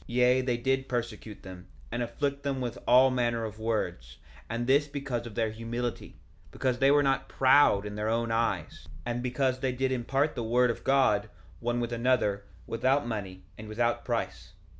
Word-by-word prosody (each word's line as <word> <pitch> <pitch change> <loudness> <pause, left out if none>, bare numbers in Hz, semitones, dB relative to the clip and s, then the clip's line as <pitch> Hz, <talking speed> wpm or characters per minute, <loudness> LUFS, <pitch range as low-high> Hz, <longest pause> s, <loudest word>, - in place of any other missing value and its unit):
1:20 - - -23
Yea, 125 +1 +3
they 125 -2 0
did 135 +2 -1
persecute 115 -3 -4
them, 90 -2 -10 0.2
and 120 - -2
afflict 140 +4 -2
them 140 -1 -2
with 120 -2 -3
all 130 +1 +6
manner 120 -2 0
of 110 0 -8
words, 60 - -3 0.3
and 115 +2 -2
this 140 +3 +3
because 140 -5 -4
of 110 - -10
their 110 -2 0
humility; 115 +2 -5 0.3
because 125 -2 -1
they 135 - +5
were 145 +1 +5
not 135 -1 0
proud 130 -6 +4
in 105 - -5
their 105 +1 -2
own 115 0 0
eyes, 115 +1 -2 0.2
and 120 0 -2
because 130 +1 0
they 130 -1 0
did 130 +1 -1
impart 135 +4 0
the - - -4
word 120 +2 +3
of - - -8
God, 110 -7 +3 0.3
one 120 0 -1
with 120 0 -2
another, 115 -4 +1 0.2
without 130 +4 +1
money 95 -5 -5 0.2
and 110 - -8
without 120 +2 0
price. 85 - -3
120 Hz, 185 wpm, -29 LUFS, 115-130 Hz, 0.3 s, all